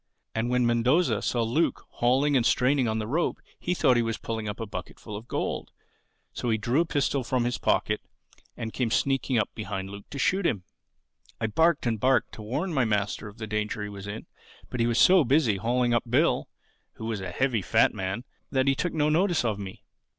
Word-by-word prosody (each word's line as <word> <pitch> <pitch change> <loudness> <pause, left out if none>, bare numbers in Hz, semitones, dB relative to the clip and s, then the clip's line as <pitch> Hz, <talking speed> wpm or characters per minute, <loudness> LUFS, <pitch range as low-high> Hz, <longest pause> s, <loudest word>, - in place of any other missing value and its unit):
And 115 +2 -1
when 125 0 +2
Mendoza 125 +9 +2
saw 120 -2 0
Luke 125 +9 0
hauling 135 +4 +2
and 125 - +4
straining 130 +2 +3
on 110 0 0
the 110 - -2
rope 155 +10 0 0.2
he 180 - -1
thought 125 -7 +4
he - - +4
was 115 -1 -1
pulling 110 -2 -4
up 105 - -6
a 115 - -3
bucketful 105 +2 -8
of 110 +3 -8
gold. - - -3 0.6
So 120 - -3
he 110 - +2
drew 120 +8 +1
a - - +1
pistol 140 -3 0
from 125 0 0
his 120 0 -1
pocket - - +1 0.6
and 110 -1 -5
came 125 -3 0
sneaking 135 +1 +1
up 105 - 0
behind 95 -2 -5
Luke 100 0 -10
to 140 - -7
shoot 190 +8 +1
him. 105 - 0 0.8
"I 115 - 0
barked 160 +8 +2
and 115 -3 0
barked 130 0 +2
to - - -10
warn 145 - -2
my 135 -4 +3
master 105 -1 -1
of 105 +1 -12
the 110 - -5
danger 105 0 -2
he 105 - -4
was 100 -1 -8
in; 105 +2 -6 0.5
but 125 - -4
he 115 - +3
was 120 -1 +1
so 185 -2 +7
busy 130 -5 +3
hauling 120 +3 +1
up 120 0 0
Bill 145 +8 +2 0.4
(who 110 - -8
was 110 -3 -2
a 95 - -4
heavy 125 +2 0
fat - - +3
man) 95 +5 -3 0.3
that 130 -1 +1
he 135 - +5
took 175 +5 -2
no 150 -2 +2
notice 170 -1 +2
of 105 -3 0
me. 95 -2 -8
120 Hz, 215 wpm, -27 LUFS, 110-135 Hz, 0.8 s, so